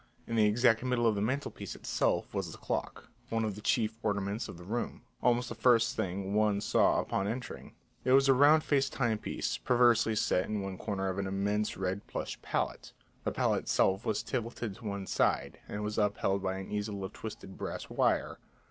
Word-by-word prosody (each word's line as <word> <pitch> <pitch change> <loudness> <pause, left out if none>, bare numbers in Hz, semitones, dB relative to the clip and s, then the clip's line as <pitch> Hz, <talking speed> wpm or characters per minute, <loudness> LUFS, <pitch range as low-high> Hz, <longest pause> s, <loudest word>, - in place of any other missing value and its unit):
In 115 - -3
the 110 -2 +5
exact 115 +1 +4
middle 125 -2 +1
of 115 - +4
the 100 - -2
mantelpiece 130 +7 -3
itself - - 0
was - - -2
the - - -10
clock, - - -4 0.2
one 115 -1 0
of 105 - -2
the 105 - -9
chief 110 0 +1
ornaments 105 +1 -1
of - - -8
the 90 - -11
room, 115 +7 -3 0.2
almost 120 0 +2
the - - -4
first 115 +1 +3
thing 95 -1 -2
one 105 -1 +3
saw 105 - +3
upon 95 - -1
entering; 120 +3 -6 0.3
it 130 - +1
was 135 0 +6
a 135 - +7
round 145 +4 +6
faced 140 -1 +1
timepiece 115 -4 -1
perversely 120 -2 +4
set 90 -3 +2
in 105 -2 -2
one 95 -1 -5
corner 100 -3 -2
of 95 +1 -2
an 100 - -1
immense 100 +2 -1
red 95 +1 -3
plush - - -5
palette; - - -3 0.3
the - - +1
palette - - +1
itself 95 +3 +2
was 110 - -1
tilted 115 -3 -3
to 115 - -13
one 100 -1 -3
side, - - 0
and 105 +1 -4
was 105 +1 -2
upheld 100 -1 +1
by 95 0 -1
an 95 - -7
easel 105 -1 -3
of 95 - -5
twisted 110 -3 -8
brass - - -5
wire. - - +1
105 Hz, 200 wpm, -31 LUFS, 100-120 Hz, 0.3 s, a